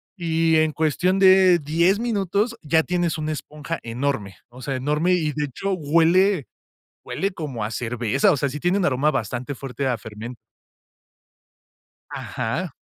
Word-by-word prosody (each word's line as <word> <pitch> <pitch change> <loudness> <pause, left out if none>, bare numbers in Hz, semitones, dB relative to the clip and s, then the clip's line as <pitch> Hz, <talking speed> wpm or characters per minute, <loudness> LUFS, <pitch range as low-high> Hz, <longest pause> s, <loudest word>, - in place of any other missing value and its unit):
Y 165 -3 +1
en 155 0 +3
cuestión 170 +5 +1
de 190 -2 +6
10 170 +5 +2
minutos 215 0 -1
ya 160 +1 +2
tienes 175 -2 -1
una 155 0 -2
esponja 150 +2 -6
enorme, 115 -5 -3
o 125 +2 -13
sea, 135 +1 -3
enorme 150 +7 +1
y, 160 -4 +1
de 150 0 -1
hecho, 195 +8 -3
huele 170 +1 +3 0.6
huele 195 +1 -2
como 135 -11 -5
a 105 - -5
cerveza, 120 - +1
o 145 - +1
sea, 140 - 0
sí 150 - -6
tiene 180 +2 +2
un 195 - +1
aroma 145 +3 +2
bastante 125 +3 -3
fuerte 135 +1 -4
a 125 - 0
fermen 110 +3 -9 1.7
Ajá. - - -4
155 Hz, 155 wpm, -23 LUFS, 130-180 Hz, 1.7 s, de